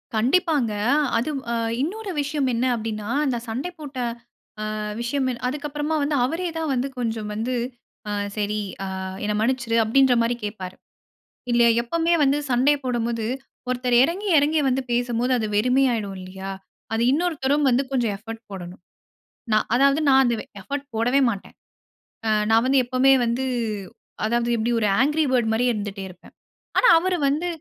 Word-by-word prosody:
கண்டிப்பாங்க. 265 Hz, -, +2 dB, 0.4 s
அது 245 Hz, +7 st, -1 dB, 0.2 s
அ -, -, 0 dB, 0.3 s
இன்னொரு 400 Hz, +6 st, -3 dB
விஷயம் 285 Hz, -1 st, -1 dB
என்ன 240 Hz, +3 st, 0 dB
அப்டின்னா, 215 Hz, -2 st, -4 dB, 0.2 s
அந்த 255 Hz, -4 st, 0 dB
சண்டை 250 Hz, +10 st, -3 dB
போட்ட 285 Hz, -3 st, -8 dB, 0.8 s
அ -, -, -4 dB, 0.2 s
விஷயம் 260 Hz, +3 st, -1 dB
என்ன 240 Hz, -, -6 dB
அதுக்கு 295 Hz, +3 st, -4 dB
அப்பறமா 295 Hz, +2 st, -2 dB
வந்து 290 Hz, +1 st, 0 dB
அவரே 340 Hz, +7 st, -1 dB
தான் 320 Hz, -3 st, -1 dB
வந்து 255 Hz, +2 st, -1 dB
கொஞ்சம் 225 Hz, -3 st, -2 dB
வந்து 235 Hz, +4 st, -2 dB, 0.6 s
ஆ -, -, -2 dB, 0.2 s
சரி 210 Hz, 0 st, -1 dB, 0.3 s
ஆ -, -, -3 dB, 0.4 s
என்ன 210 Hz, -, 0 dB
மன்னிச்சிரு 235 Hz, -1 st, 0 dB
அப்டின்றமாரி 245 Hz, 0 st, +3 dB
கேப்பாரு. 190 Hz, -3 st, -5 dB, 0.8 s
இல்ல 240 Hz, 0 st, +4 dB, 0.2 s
எப்பமே 335 Hz, +7 st, +1 dB
வந்து 280 Hz, +1 st, +3 dB
சண்டை 260 Hz, +4 st, +4 dB
போடும்போது, 235 Hz, -2 st, -1 dB, 0.4 s
ஒருத்தர் 250 Hz, -1 st, +1 dB
இறங்கி 380 Hz, +7 st, -2 dB
இறங்கி 300 Hz, +2 st, +2 dB
வந்து 260 Hz, +1 st, +1 dB
பேசும்போது 245 Hz, +1 st, 0 dB
அது 220 Hz, -, -1 dB
வெறுமையாயிடும் 235 Hz, -3 st, +2 dB
இல்லயா! 190 Hz, +1 st, -7 dB, 0.4 s
அது 225 Hz, +1 st, +1 dB
இன்னொருத்தரும் 295 Hz, -2 st, +1 dB
வந்து 250 Hz, +3 st, +3 dB
கொஞ்சம் 240 Hz, -6 st, 0 dB
எஃபர்ட் 225 Hz, +2 st, -9 dB
போடணும். 180 Hz, -2 st, -8 dB, 0.7 s
நான் 215 Hz, -, +3 dB
அதாவது 275 Hz, +3 st, +4 dB
நான் 270 Hz, 0 st, +6 dB
அந்த 240 Hz, -1 st, +2 dB
வே -, -, -8 dB, 0.2 s
எஃபர்ட் 280 Hz, +7 st, -5 dB
போடவே 245 Hz, +5 st, +2 dB
மாட்டேன். 200 Hz, -3 st, -7 dB, 0.7 s
ஆ -, -, +2 dB, 0.2 s
நான் 225 Hz, +1 st, +5 dB
வந்து 270 Hz, 0 st, +4 dB
எப்பமே 255 Hz, +2 st, +4 dB
வந்து 235 Hz, +3 st, -1 dB, 0.8 s
அதாவது 235 Hz, +2 st, 0 dB
எப்படி 230 Hz, +2 st, 0 dB
ஒரு 210 Hz, -, +1 dB
ஆங்க்ரி 300 Hz, +3 st, +3 dB
பேர்ட் 240 Hz, -3 st, +2 dB
மாரியே 245 Hz, +2 st, +2 dB
இருந்துட்டே 205 Hz, -2 st, -5 dB
இருப்பேன். 180 Hz, -, -16 dB, 0.4 s
ஆனா, -, -, +5 dB
அவரு 365 Hz, +1 st, 0 dB
வந்து 305 Hz, +6 st, 0 dB
245 Hz, 155 wpm, -23 LUFS, 225-285 Hz, 0.8 s, நான்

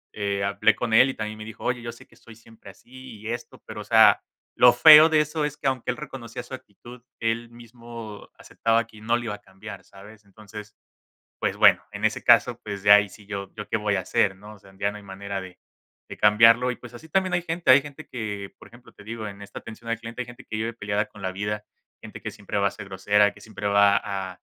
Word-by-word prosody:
eh, 100 Hz, -1 st, -2 dB
hablé 100 Hz, +2 st, +2 dB
con 115 Hz, 0 st, -3 dB
él 130 Hz, +4 st, +6 dB
y -, -, -3 dB
también 110 Hz, 0 st, -6 dB
me -, -, -7 dB
dijo: 110 Hz, -, -11 dB
"Oye, 125 Hz, -1 st, -1 dB
yo 120 Hz, 0 st, -6 dB
sé 115 Hz, -, -16 dB
que -, -, -24 dB
soy 115 Hz, -, -16 dB
siempre 115 Hz, -2 st, -16 dB
así 120 Hz, +4 st, -13 dB
y 110 Hz, -, -10 dB
esto", 120 Hz, +1 st, -7 dB
pero, -, -, -8 dB
o -, -, -7 dB
sea, -, -, +5 dB, 0.3 s
lo 125 Hz, -, +7 dB
feo 155 Hz, +5 st, +9 dB
de 155 Hz, -1 st, +3 dB
eso 150 Hz, +1 st, -2 dB
es 150 Hz, 0 st, -5 dB
que, -, -, -14 dB
aunque 130 Hz, -2 st, -2 dB
él 125 Hz, -, -1 dB
reconocía 125 Hz, -5 st, -8 dB
su 125 Hz, -, -13 dB
actitud, 120 Hz, 0 st, -12 dB, 0.2 s
él 115 Hz, +1 st, -2 dB
mismo 115 Hz, -2 st, -11 dB
aceptaba 115 Hz, +1 st, 0 dB
qui 110 Hz, -2 st, -17 dB
no 115 Hz, +2 st, +1 dB
lo 120 Hz, -, -6 dB
iba 115 Hz, -3 st, -4 dB
a 105 Hz, -, -10 dB
cambiar, 95 Hz, +2 st, -11 dB
¿sabes? 105 Hz, +2 st, -16 dB
Entonces, 105 Hz, +1 st, -12 dB, 0.6 s
pues -, -, -2 dB
bueno, -, -, +5 dB
en -, -, -3 dB
ese -, -, -1 dB
caso, -, -, +4 dB
pues, 100 Hz, -2 st, -6 dB
ya 100 Hz, 0 st, +9 dB
ahí 100 Hz, -1 st, +2 dB
sí 105 Hz, +1 st, -16 dB
yo 100 Hz, -1 st, -6 dB
yo 105 Hz, -1 st, -8 dB
¿qué -, -, -2 dB
voy 105 Hz, -1 st, 0 dB
a -, -, 0 dB
hacer, 95 Hz, +1 st, 0 dB
no? 105 Hz, +2 st, -12 dB
O 105 Hz, -, -17 dB
sea, 95 Hz, 0 st, -19 dB
ya 100 Hz, 0 st, 0 dB
no 105 Hz, -, -9 dB
hay 105 Hz, -, -13 dB
manera 100 Hz, 0 st, -6 dB
de 95 Hz, -1 st, -12 dB, 0.5 s
de -, -, -8 dB
cambiarlo 115 Hz, +4 st, +5 dB
y, -, -, -6 dB
pues, 120 Hz, -1 st, -13 dB
así 160 Hz, +7 st, -12 dB
también 185 Hz, +2 st, 0 dB
hay 175 Hz, -, +1 dB
gente, 170 Hz, +1 st, -3 dB
hay 135 Hz, +2 st, +7 dB
gente 145 Hz, +1 st, -11 dB
que, 105 Hz, -4 st, -6 dB
por -, -, -15 dB
ejemplo, 120 Hz, +1 st, -17 dB
te -, -, -16 dB
digo, 110 Hz, 0 st, -6 dB
en 100 Hz, 0 st, -10 dB
esta 100 Hz, -, -9 dB
atención 115 Hz, +1 st, -11 dB
al 115 Hz, -, -2 dB
cliente, 115 Hz, +2 st, -7 dB
hay -, -, -5 dB
gente 120 Hz, +2 st, -13 dB
que -, -, -4 dB
vive 115 Hz, +2 st, -3 dB
peleada 105 Hz, -1 st, -2 dB
con 105 Hz, -1 st, -16 dB
la 95 Hz, -1 st, -3 dB
vida, 105 Hz, +2 st, -4 dB, 0.4 s
gente -, -, -10 dB
que -, -, -5 dB
siempre -, -, -6 dB
va 100 Hz, -, +1 dB
a -, -, -3 dB
ser 100 Hz, -, -10 dB
grosera, 100 Hz, +2 st, +2 dB
que 100 Hz, -, -17 dB
siempre 105 Hz, -1 st, -6 dB
va 100 Hz, 0 st, +4 dB
a 95 Hz, -2 st, -5 dB
110 Hz, 255 wpm, -24 LUFS, 100-120 Hz, 0.6 s, feo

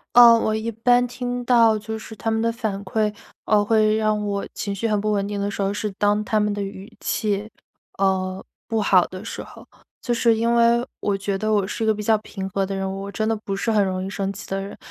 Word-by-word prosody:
呃， 240 Hz, -1 st, +10 dB
我 215 Hz, -1 st, 0 dB
一 220 Hz, +1 st, -2 dB
般 245 Hz, +2 st, +3 dB
听 245 Hz, 0 st, -4 dB
到 230 Hz, -3 st, +5 dB
就 220 Hz, +1 st, -5 dB
是 220 Hz, 0 st, -10 dB
他 225 Hz, +3 st, -3 dB
们 220 Hz, 0 st, +1 dB
的 230 Hz, +1 st, +1 dB
反 215 Hz, -4 st, -3 dB
馈， 210 Hz, +2 st, 0 dB, 0.3 s
呃， 205 Hz, -1 st, +3 dB
会 215 Hz, 0 st, +3 dB
让 215 Hz, -1 st, +1 dB
我 200 Hz, -1 st, -2 dB
情 200 Hz, -1 st, -3 dB
绪 230 Hz, +3 st, -1 dB
很 210 Hz, -1 st, +1 dB
不 215 Hz, 0 st, 0 dB
稳 200 Hz, -1 st, 0 dB
定 205 Hz, -1 st, -3 dB
的 200 Hz, -, -1 dB
时 200 Hz, -, -7 dB
候， 195 Hz, 0 st, 0 dB
是 210 Hz, 0 st, -2 dB
当 205 Hz, +1 st, +2 dB
他 215 Hz, 0 st, +1 dB
们 210 Hz, 0 st, +1 dB
的 205 Hz, -, -3 dB
语 200 Hz, +3 st, -7 dB
气， 210 Hz, 0 st, -1 dB, 0.5 s
呃， 190 Hz, -1 st, 0 dB, 0.2 s
不 225 Hz, -1 st, 0 dB
好 185 Hz, -3 st, +5 dB
的 185 Hz, +4 st, -9 dB
时 -, -, -5 dB
候。 -, -, -13 dB, 0.4 s
就 245 Hz, -, 0 dB
是 230 Hz, -1 st, +3 dB
因 230 Hz, +1 st, +1 dB
为 235 Hz, +1 st, +4 dB
我 200 Hz, -1 st, 0 dB
觉 195 Hz, 0 st, -2 dB
得 215 Hz, +2 st, 0 dB
我 200 Hz, -2 st, +2 dB
是 215 Hz, -, -5 dB
一 220 Hz, -, +1 dB
个 220 Hz, -, +4 dB
比 210 Hz, -, -5 dB
较 220 Hz, 0 st, +3 dB
平 195 Hz, -2 st, -6 dB
和 195 Hz, 0 st, 0 dB
的 195 Hz, 0 st, -4 dB
人， 195 Hz, 0 st, -2 dB
我 200 Hz, 0 st, -6 dB
真 215 Hz, +2 st, -2 dB
的 225 Hz, -, +2 dB
不 195 Hz, -, -2 dB
是 225 Hz, +3 st, -1 dB
很 210 Hz, -1 st, +3 dB
容 185 Hz, 0 st, -2 dB
易 -, -, -4 dB
生 195 Hz, -1 st, -3 dB
气 200 Hz, -, -9 dB
的 195 Hz, 0 st, -1 dB
人， 195 Hz, -, -8 dB
210 Hz, 275 characters per minute, -23 LUFS, 200-225 Hz, 0.5 s, 呃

